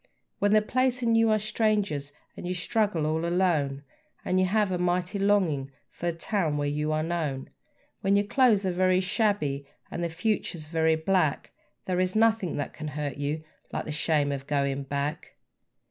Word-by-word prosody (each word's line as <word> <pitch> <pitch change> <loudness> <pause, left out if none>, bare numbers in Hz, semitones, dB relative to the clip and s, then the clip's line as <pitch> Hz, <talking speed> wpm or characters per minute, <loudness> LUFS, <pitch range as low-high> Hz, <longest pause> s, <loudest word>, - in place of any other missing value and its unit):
When 205 +1 +3
the 215 0 +5
place 255 +2 +1
and 230 -1 +3
you 225 0 +4
are 215 - +4
strangers 205 -9 0 0.2
and - - -6
you 180 - -1
struggle 200 -3 0
all 160 +1 0
alone, 165 -6 +1 0.4
And 185 - +2
you 185 - +3
have 210 0 +2
a 180 - -1
mighty 180 +2 0
longing 185 -9 +2 0.2
for 175 0 -2
the 165 - -12
town 165 -5 0
where 145 0 0
you 150 +1 -1
are 155 0 0
known; 155 -5 -3 0.5
When 195 +1 +2
your 205 0 +3
clothes 220 -4 +3
are 185 - +1
very 185 +1 +3
shabby 185 - 0 0.2
and 170 - -3
the 170 - 0
future's 170 -2 -2
very 160 0 +2
black, 160 -2 0 0.3
There 180 -1 0
is 185 +1 0
nothing 220 -5 +2
that 145 - -3
can 155 - -6
hurt 145 -1 -4
you 145 +2 -2 0.3
like - - -3
the - - -4
shame 150 -1 +1
of 140 -1 -5
going 140 -1 0
back. 140 +3 -3
175 Hz, 185 wpm, -27 LUFS, 150-205 Hz, 0.5 s, the